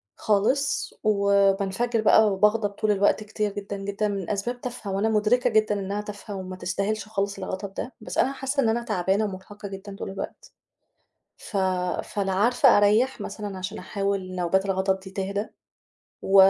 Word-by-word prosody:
خالص، 220 +7 +1
وبانفجر 200 +2 +2
بقى 220 -1 +6
وباغضب 210 +2 +3
طول 210 +1 0
الوقت 205 +1 +2
كتير 210 -1 -2
جدًا 200 0 -5
جدًا 200 +2 -2
من 195 -3 -3
أسباب 240 +5 -2
تافهة 240 -5 -5
وأنا 200 +3 +1
مدركة 225 +4 +3
جدًا 215 -2 +2
إنها 200 +1 -2
تافهة 205 0 -7
وما 185 -1 -6
تستاهلش 200 +4 -2
خالص 200 -2 -2
الغضب 190 +1 -5
ده، 245 - -5
بس - - -6
أنا 270 - +3
حاسة 270 +1 -1
إن 225 - +3
أنا 235 +2 0
تعبانة 200 -1 +1
ومرهقة 200 +1 -7
جدًا 195 +1 -8
طول 195 - -6
الوقت. 195 - -7 0.8
ف 205 - -5 0.5
فلا 195 -2 -2
عارفة 240 +5 +5
أريح 215 +6 +3
مثلًا 205 -3 -5
عشان 185 +3 -5
أحاول 195 -2 -2
نوبات 180 +2 +1
الغضب 190 0 +1
دي 190 0 -11
تهدا، 200 +2 -3 0.7
و 195 - 0
205 Hz, 160 wpm, -25 LUFS, 195-215 Hz, 0.8 s, بقى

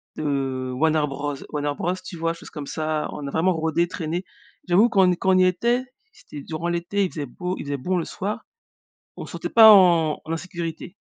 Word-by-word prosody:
de 135 -3 -2
Warner 155 +2 +2
Bros 145 +1 -4 0.2
Warner 145 -1 -1
Bros, 175 +2 -1
tu 180 - -8
vois, 165 0 -1
choses 170 - -12
comme 150 -3 -7
ça, 155 0 -2
on 145 -1 -6
a 140 - -5
vraiment 180 +3 +2
rôdé, 160 +1 0
traîné. 170 +1 -4 0.5
J'avoue, 195 +7 +5
quand 195 -4 +4
on - - +4
quand 190 +2 0
on 185 - +4
y 185 - +5
était, 235 +8 +1 0.3
c'était 150 - -11
durant 160 +3 -4
l'été, 175 +4 -1
il 185 - 0
faisait 150 -3 -4
beau, 180 +8 -5
il - - -7
faisait 145 - -2
bon 180 +8 -1
le 170 - -2
soir, 205 +3 -5 0.7
on - - -7
se - - -11
sentait - - -5
pas 225 -1 +9
en 170 -6 +5
en 160 - -5
insécurité, 170 +1 -6
165 Hz, 215 wpm, -23 LUFS, 150-185 Hz, 0.7 s, pas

